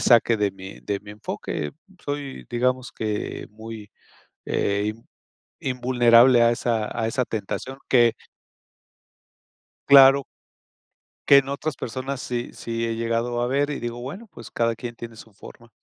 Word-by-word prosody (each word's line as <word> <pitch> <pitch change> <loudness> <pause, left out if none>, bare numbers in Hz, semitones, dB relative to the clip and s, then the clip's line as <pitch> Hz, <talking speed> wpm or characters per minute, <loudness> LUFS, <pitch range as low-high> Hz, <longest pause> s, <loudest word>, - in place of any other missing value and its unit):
saque 120 -1 +4
de 105 -1 +1
mi 95 0 -11
de 100 -1 -3
mi 105 0 -12
enfoque. 80 -7 -5 0.3
Soy, 145 -2 -5
digamos 125 +1 0
que, 105 -1 -4
muy, 110 -1 -10 0.6
eh, 100 +1 0 0.7
invulnerable 125 -1 +4
a 115 - +5
esa 115 -2 -1
a 110 - 0
esa 125 +2 -1
tentación, 115 +5 -5
que 120 -3 +5 1.8
Claro. 135 0 +8 1.0
Que 140 - +9
en 135 0 0
otras 140 +2 -3
personas 130 +3 -5
sí 120 -1 -4
sí 115 0 -4
he 115 0 -2
llegado 115 +1 -1
a 120 - +1
ver 140 +3 0
y 145 - -3
digo, 120 0 -5
bueno, 180 - -7
pues 120 - -12
cada 115 -1 0
quien 120 0 -7
tiene 115 -1 -9
su 110 -1 -14
forma. 115 +4 -14
120 Hz, 145 wpm, -24 LUFS, 115-130 Hz, 1.8 s, Que